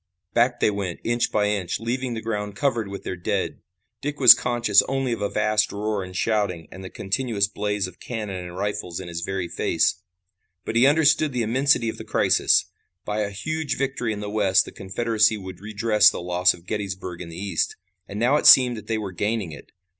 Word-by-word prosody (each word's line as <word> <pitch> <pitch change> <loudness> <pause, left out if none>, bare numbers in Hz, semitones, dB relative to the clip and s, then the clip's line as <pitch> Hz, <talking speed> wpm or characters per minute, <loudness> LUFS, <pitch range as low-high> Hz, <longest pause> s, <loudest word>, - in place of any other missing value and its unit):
Back 120 +1 +2
they - - +3
went, 100 -4 -4
inch 120 +1 0
by 105 -1 +1
inch, 100 -4 -2
leaving 120 +2 -3
the 110 - -6
ground 105 -2 -4
covered 120 -7 0
with 100 0 -8
their 95 - -4
dead. 90 - -3 0.4
Dick 145 +1 -4
was 125 -3 +11
conscious 120 -4 +2
only 135 -1 -1
of 115 - -5
a 100 - 0
vast 105 0 +1
roar 105 -1 -2
and 90 0 -10
shouting 100 -7 -1
and 95 - -10
the 95 - -7
continuous 100 0 -1
blaze 105 -1 -2
of 95 -1 -11
cannon 105 -5 -5
and 90 0 -9
rifles 100 -3 -3
in - - -8
his 85 0 -5
very 95 0 -3
face. 85 0 0 0.6
But - - -4
he 120 +3 +5
understood 150 -1 +3
the 125 -2 0
immensity 125 +1 +2
of 110 - -4
the - - -6
crisis. - - +2 0.4
By 105 0 -2
a 105 -1 -1
huge 150 +7 -3
victory 135 -4 -2
in 105 -1 -5
the 105 - -5
West 100 -3 +3
the - - -10
Confederacy 110 +2 0
would 95 -2 -9
redress 105 0 +3
the - - -5
loss 90 +1 +2
of 85 - -19
Gettysburg 95 -4 -5
in 85 - -8
the 85 - -9
East. 95 -3 -2 0.3
And 100 - -6
now 125 +6 +3
it - - +2
seemed 125 -2 +7
that 105 - -10
they 110 0 -1
were 105 -3 -5
gaining 105 0 -2
it. 75 - -12
105 Hz, 210 wpm, -23 LUFS, 95-120 Hz, 0.6 s, was